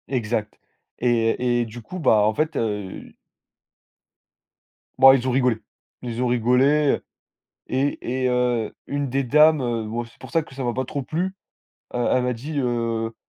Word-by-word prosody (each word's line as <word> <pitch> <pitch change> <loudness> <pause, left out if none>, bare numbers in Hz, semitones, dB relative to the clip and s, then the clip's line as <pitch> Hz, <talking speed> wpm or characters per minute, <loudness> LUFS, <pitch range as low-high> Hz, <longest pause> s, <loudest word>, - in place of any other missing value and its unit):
Exact, 115 -4 -2 0.4
et- 120 0 +1
et - - -1
du 115 +2 -9
coup, 185 +12 -8
bah, 110 -10 +4
en 110 +1 +2
fait, 155 +5 -1
heu 105 -4 -4 1.9
bah, 135 0 +9
ils 130 -1 -1
ont - - +1
rigolé. 125 -3 +2 0.4
Ils 120 -1 -4
ont 125 - +1
rigolé, 125 +5 +3 0.7
et 130 -1 -1
et 130 - +2
heu, 125 -3 0
une 145 -1 -2
des 135 +2 0
dames, 150 +3 +5
heu, 120 -3 -1
bon, 115 +2 -3
c'est 115 - -20
pour - - -11
ça 165 -2 +2
que 135 - -15
ça 135 - -4
m'a 120 -1 -1
pas 130 +2 -2
trop 140 +2 -4
plu, 175 +7 -3 0.6
heu, 120 -1 0
elle 130 - +2
m'a 125 0 0
dit, 145 +6 -5
heu: 115 -3 -1
125 Hz, 170 wpm, -23 LUFS, 115-135 Hz, 1.9 s, bah